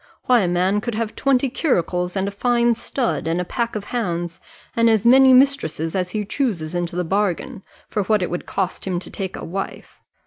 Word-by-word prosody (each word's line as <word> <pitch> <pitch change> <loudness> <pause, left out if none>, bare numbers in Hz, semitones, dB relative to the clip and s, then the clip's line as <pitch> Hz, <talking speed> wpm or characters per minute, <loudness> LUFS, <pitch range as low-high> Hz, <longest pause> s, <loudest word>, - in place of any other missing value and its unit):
Why, 250 -2 +5
a 190 - +1
man 185 +4 +1
could 235 0 -3
have 220 -1 -3
twenty 275 -1 +2
curricles, 180 - 0
and 195 0 0
a - - -2
fine 240 +3 +2
stud, 235 -3 -2
and 165 +2 0
a 180 - -2
pack 235 +4 -2
of 210 - -3
hounds, 175 -7 -3 0.4
and 230 0 +4
as 220 -2 +2
many 265 +2 +7
mistresses 255 - +3
as 185 -2 -1
he 210 +2 -3
chooses 195 - -2
into 175 0 -2
the 180 - 0
bargain, 200 +5 -1 0.3
for 210 - -1
what 210 -1 +2
it - - -3
would 175 - -4
cost 190 0 -3
him 185 -2 -1
to 175 - -7
take 190 -2 -4
a - - -7
wife. 195 +3 -6
200 Hz, 210 wpm, -21 LUFS, 180-240 Hz, 0.4 s, many